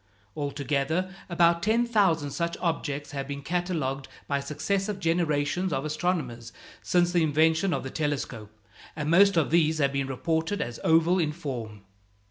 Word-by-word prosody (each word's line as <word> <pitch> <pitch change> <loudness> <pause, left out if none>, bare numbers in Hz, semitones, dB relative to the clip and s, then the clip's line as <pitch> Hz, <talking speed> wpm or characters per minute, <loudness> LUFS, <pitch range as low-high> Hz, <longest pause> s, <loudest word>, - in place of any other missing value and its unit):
Altogether 145 +5 -1 0.2
about 170 -1 +3
ten 225 +5 +2
thousand 190 -11 +2
such 170 +3 -2
objects 150 -4 -2
have 140 -1 -4
been 140 0 -6
catalogued 155 -5 -2 0.2
by 140 -1 0
successive 190 +8 -2
generations 165 +1 0
of 135 0 -1
astronomers 150 -8 -2 0.3
since 175 -1 +2
the 175 -1 +2
invention 160 +4 +3
of 140 - -1
the 130 - -6
telescope, 140 -8 -3 0.5
and 150 0 -2
most 195 +1 +6
of 155 -3 +2
these 160 -1 +3
have 140 -2 +1
been 140 -1 -1
reported 160 +8 -1
as 120 -1 -4
oval 165 +3 +4
in 155 -3 +1
form. 120 - -6
160 Hz, 150 wpm, -27 LUFS, 140-175 Hz, 0.5 s, most